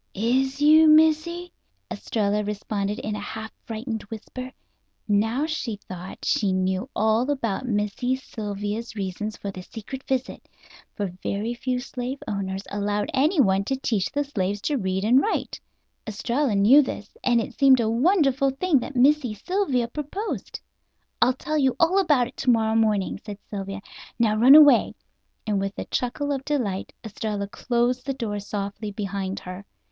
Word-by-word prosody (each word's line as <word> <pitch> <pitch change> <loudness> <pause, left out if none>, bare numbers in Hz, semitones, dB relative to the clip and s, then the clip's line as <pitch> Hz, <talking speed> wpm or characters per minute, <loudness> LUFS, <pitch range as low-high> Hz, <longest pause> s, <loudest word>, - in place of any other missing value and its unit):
"Is 260 +6 +1
you, 315 +1 +7
Missy?" 320 +3 +3 0.4
Estralla 210 -1 -1
responded 205 0 -3
in 215 0 -4
a - - -4
half 220 +1 -6
frightened 225 0 -4
whisper. 255 +3 -7 0.6
Now, 225 +7 +1
she 310 -8 -3
thought, 185 -2 -9
she 200 -3 +2
knew 185 +5 -1
all 220 +4 +2
about 255 -3 -1
Missy 210 +3 0
Sylvia's 210 -2 -5
reasons 205 +2 -4
for 200 - -5
the 185 - -8
secret 230 +7 -8
visit. 265 -1 -3 0.5
For 205 - -2 0.2
very 215 +4 -2
few 250 +1 -2
slave 250 +1 -5
owners 195 -1 -3
allowed 205 0 -1
anyone 265 - +3
to 270 - 0
teach 225 -7 -1
the 290 - 0
slaves 205 -8 -2
to 295 - -1
read 190 -2 -1
and 250 +5 +5
write. 435 - -2 0.5
Estralla 235 +3 -1
knew 220 +9 +7
this, 215 -6 -6
and 240 -2 +3
it 230 - -4
seemed 270 -2 +5
a 230 - +1
wonderful 275 - +3
thing 280 +2 +1
that 275 - -7
Missy 260 -3 +3
Sylvia 275 - 0
proposed. 300 - -5 0.6
"I'll 255 - +5
tell 305 +4 -2
you 265 -3 +2
all 350 +4 +4
about 290 -10 +3
it 250 - -15
to 265 - -1
morrow 220 -2 +3
morning," 215 -3 +1
said 205 -2 -7
Sylvia; 195 -1 -5 0.4
"now 220 -2 +2
run 250 +6 +8
away," 290 -5 +7 0.5
and 210 -2 0
with 195 +1 -3
a - - -4
chuckle 285 +4 -2
of 275 -1 -2
delight 235 -11 -2
Estralla 210 -2 -4
closed 245 +4 -1
the 275 - -1
door 215 -5 -3
softly 205 +1 -5
behind 200 -1 -4
her. 185 +2 -8
230 Hz, 160 wpm, -24 LUFS, 205-270 Hz, 0.6 s, run